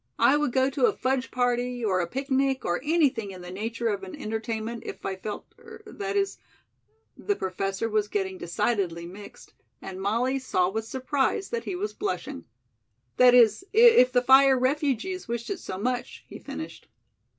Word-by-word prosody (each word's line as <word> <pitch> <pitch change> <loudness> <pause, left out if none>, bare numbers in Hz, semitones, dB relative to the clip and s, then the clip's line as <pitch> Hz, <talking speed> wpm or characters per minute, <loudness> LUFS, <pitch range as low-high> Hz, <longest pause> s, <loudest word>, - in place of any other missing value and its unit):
"I 275 - +5
would 295 -3 +1
go 260 +1 +3
to 465 - +3
a 425 - -1
fudge 260 0 -1
party 245 -1 -1
or 185 -3 +1
a 175 - -1
picnic 270 - -1
or 175 +7 0
anything 290 -9 +1
in 185 -2 -9
the 180 0 -9
nature 230 +4 -3
of 200 -2 -2
an 190 -1 -8
entertainment, 225 +1 -4
if - - -8
I 195 - -2
felt 205 +2 -7
er 450 -2 -13
that 400 -1 -5
is 395 0 -1 0.4
" 445 0 -43
the 410 - -1
Professor 195 - -2
was 215 -1 0
getting 190 -3 -3
decidedly 175 -2 -1
mixed, 200 +4 -12 0.3
and 190 0 -8
Molly 240 +7 0
saw 185 -8 +1
with 220 +2 -3
surprise 265 - -1
that 470 -1 -3
he 370 - -3
was 415 +4 -3
blushing. 410 - -4 0.7
"That 250 -1 +7
is, 230 - +5
if 440 - +7
the 245 0 +2
fire 265 +1 +6
refugees 290 - -1
wished 235 - -4
it 390 - -3
so 185 - -6
much," 245 +4 -3
he - - -10
finished. - - -8
245 Hz, 180 wpm, -26 LUFS, 205-275 Hz, 0.7 s, That